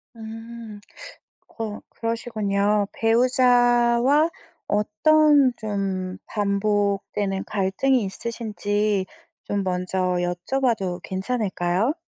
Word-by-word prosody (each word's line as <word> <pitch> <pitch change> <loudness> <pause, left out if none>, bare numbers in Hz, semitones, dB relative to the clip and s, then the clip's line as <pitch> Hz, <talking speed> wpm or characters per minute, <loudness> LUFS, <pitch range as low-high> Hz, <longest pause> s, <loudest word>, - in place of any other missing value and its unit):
음. 225 -1 -9 0.8
어 215 -2 -4
그러시군요. 210 -3 -1
배우자와 245 +4 +3 0.4
어떤 275 +6 +4
좀 195 -3 -3
반복되는 200 -1 0
갈등이 215 +6 +1
있으신지 210 -1 -2 0.4
좀 200 -1 -1
먼저 180 0 -2 0.2
여쭤봐도 185 +1 -1
괜찮을까요? 190 +1 -1
210 Hz, 185 characters per minute, -23 LUFS, 195-235 Hz, 0.8 s, 어떤